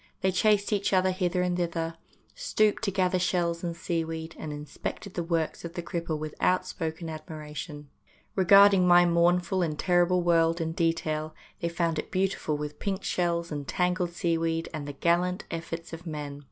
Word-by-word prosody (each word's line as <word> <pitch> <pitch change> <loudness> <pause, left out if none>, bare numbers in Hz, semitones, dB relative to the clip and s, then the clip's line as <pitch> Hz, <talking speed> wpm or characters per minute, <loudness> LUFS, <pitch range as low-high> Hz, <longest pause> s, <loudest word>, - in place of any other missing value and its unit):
They 190 - +2
chased 205 +2 +2
each 200 -1 0
other 185 0 +4
hither 180 0 0
and 180 -1 0
thither, 165 -2 -2 0.4
stooped 215 - +1
to 200 - 0
gather 185 -1 +1
shells 175 -1 0
and 170 -1 -2
seaweed, 165 -1 -3
and 155 - -5
inspected 150 +6 -6
the 175 - -2
works 165 -2 -1
of 170 +1 -7
the 175 - -4
cripple 165 -2 -3
with 155 0 -5
outspoken 170 -3 0
admiration. 155 -1 -7 0.5
Re 190 - +2
garding 195 -1 +7
my 175 0 +7
mournful 175 +2 +2
and 155 -3 -1
terrible 175 +1 +3
world 165 0 +3
in 160 -1 -1
detail, 160 -2 -1 0.2
they 170 - -1
found 170 -2 0
it - - -5
beautiful 185 -5 0
with 150 0 -6
pink 195 -1 -2
shells 170 -1 -1
and 145 -2 -4
tangled 180 -1 0
seaweed 165 -1 0
and 150 -2 -5
the 145 - -5
gallant 175 +5 +1
efforts 165 0 -5
of 165 +2 -8
men. 145 -2 -5
170 Hz, 175 wpm, -28 LUFS, 160-180 Hz, 0.5 s, garding